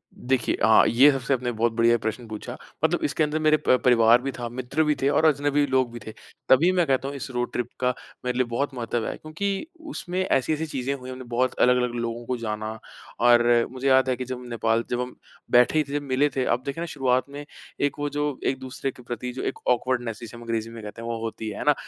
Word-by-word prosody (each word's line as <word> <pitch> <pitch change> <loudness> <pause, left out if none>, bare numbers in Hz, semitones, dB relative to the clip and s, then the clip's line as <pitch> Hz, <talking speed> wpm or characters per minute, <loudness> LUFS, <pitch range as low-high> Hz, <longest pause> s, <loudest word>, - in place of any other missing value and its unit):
देखिए 130 -1 0
हाँ, - - +6
ये 135 +5 +6
सबसे 135 0 -1
आपने 125 -1 -1
बहुत 115 +1 +1
बढ़िया 115 +1 +4
प्रश्न 110 +2 -4
पूछा। 110 +3 -6 0.3
मतलब 170 +2 +2
इसके 155 +2 +1
अंदर 150 +1 0
मेरे 155 0 +4
प 130 - +6
परिवार 120 0 +6
भी 135 +1 -3
था, 120 -2 -5
मित्र 130 +5 -1
भी 150 -1 +2
थे 135 - +3
और 160 +2 +3
अजनबी 145 -1 +3
लोग 130 -2 +1
भी 120 - -7
थे। 110 - -6 0.4
तभी 160 +8 +6
मैं 180 -2 +2
कहता 135 0 +1
हूँ 140 - -5
इस 135 - -6
रोड 125 0 -2
ट्रिप 125 -1 -1
का 125 0 +1 0.3
मेरे 125 0 -1
लिए 130 - +2
बहुत 135 +4 -2
महत्व 120 -2 -2
है - - -3
क्योंकि 195 - -3 0.2
उसमें 180 -8 -4
ऐसी-ऐसी 155 +1 +1
चीज़ें 135 -2 -3
हुई 130 -2 -8
हमने 130 0 -7
बहुत 125 +1 +1
अलग-अलग 125 -1 +3
लोगों 115 0 -3
को 125 0 -2
जाना, 110 -1 -4 0.5
और 120 0 +5
मुझे 130 +1 -3
याद 130 0 +4
है 125 - +2
कि 125 +1 -5
जब 125 0 -6
नेपाल 115 0 +1
जब 125 0 -1
हम 125 0 -6 0.4
बैठे 125 +5 +5
ही - - +3
थे 145 - +1
मिले 140 +1 +1
थे, 130 - 0
अब 125 - 0
देखे 140 +4 -4
ना - - -1
शुरुआत 130 -3 +1
में 145 +1 -8 0.4
एक 145 0 0
वो 145 0 -1
जो 145 -2 -2
एक-दूसरे 130 0 -3
के 125 - -16
प्रति 125 +1 -5
जो 130 - -5
एक - - -18
ऑकवर्डनेस 120 -2 -1
जिसे 115 +1 -9
हम 120 - -10
अंग्रेज़ी 115 -1 -2
में 115 -1 -9
कहते 105 +2 -8
हैं 115 - -6
वो 115 - -2
होती 110 -1 -4
है, 105 - -6
है - - -4
ना? 150 - +6
125 Hz, 240 wpm, -25 LUFS, 120-140 Hz, 0.5 s, हाँ